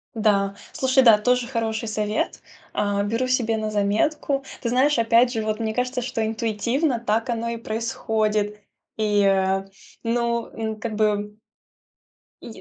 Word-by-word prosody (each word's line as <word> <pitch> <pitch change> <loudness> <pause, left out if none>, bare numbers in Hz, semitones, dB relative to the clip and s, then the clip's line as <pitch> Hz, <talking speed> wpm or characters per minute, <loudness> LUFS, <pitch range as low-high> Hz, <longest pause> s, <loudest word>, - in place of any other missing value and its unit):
Да, 200 -3 +2 0.2
слушай, 265 -3 +3
да, 230 -4 +8
тоже 250 +3 +1
хороший 230 -2 -2
совет, 215 0 -1 0.3
а, 205 -1 0
беру 230 +5 -1
себе 235 -3 +1
на 215 0 -2
заметку. 245 +7 0 0.2
Ты 235 - -1
знаешь, 265 +4 +3
опять 230 +2 +4
же, 225 - -1
вот 215 0 -2
мне 220 -1 -1
кажется, 250 +1 -1
что 235 -2 -2
интуитивно 230 +5 0
так 225 +3 0
оно 235 0 -1
и 235 - -3
происходит. 215 -2 -1 0.4
И, 210 -1 +1
э, 195 0 +2 0.4
ну 235 0 0
ну 220 -1 -3
как 215 0 -4
бы 210 -1 0 1.1
И - - -10
225 Hz, 150 wpm, -23 LUFS, 210-240 Hz, 1.1 s, да